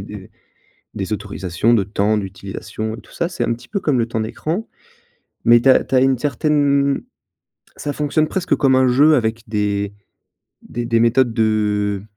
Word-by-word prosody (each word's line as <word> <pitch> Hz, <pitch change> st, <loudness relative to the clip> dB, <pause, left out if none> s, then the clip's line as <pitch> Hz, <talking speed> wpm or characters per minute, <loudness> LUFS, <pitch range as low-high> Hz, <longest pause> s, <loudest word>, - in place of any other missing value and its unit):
des -, -, -10 dB, 0.6 s
des 100 Hz, +2 st, -4 dB
autorisations 100 Hz, +1 st, -1 dB
de 105 Hz, -4 st, +2 dB
temps, 105 Hz, +2 st, 0 dB
d'utilisation 100 Hz, +2 st, -5 dB
et -, -, -11 dB
tout -, -, -20 dB
ça. 170 Hz, -, -2 dB
C'est 180 Hz, 0 st, -3 dB
un 115 Hz, -, 0 dB
petit 120 Hz, -, -9 dB
peu 200 Hz, -, -2 dB
comme 145 Hz, -7 st, +1 dB
le 115 Hz, -, +1 dB
temps 115 Hz, -1 st, -2 dB
d'écran, 160 Hz, -, -3 dB, 0.8 s
mais 120 Hz, 0 st, +6 dB
tu 135 Hz, -, +5 dB
as -, -, +4 dB
tu -, -, -4 dB
as 130 Hz, -, +5 dB
une 130 Hz, -2 st, +2 dB
certaine 140 Hz, -1 st, +1 dB, 0.8 s
ça 145 Hz, -, -4 dB
fonctionne 150 Hz, +1 st, 0 dB
presque 180 Hz, +2 st, 0 dB
comme 135 Hz, -2 st, +3 dB
un 130 Hz, 0 st, +4 dB
jeu 145 Hz, +5 st, +5 dB
avec 115 Hz, -3 st, -1 dB
des 100 Hz, -1 st, -1 dB, 0.7 s
des 120 Hz, -, -5 dB
des 115 Hz, -1 st, +1 dB
méthodes 120 Hz, +1 st, +3 dB
de 105 Hz, -2 st, 0 dB
115 Hz, 180 wpm, -19 LUFS, 105-140 Hz, 0.8 s, mais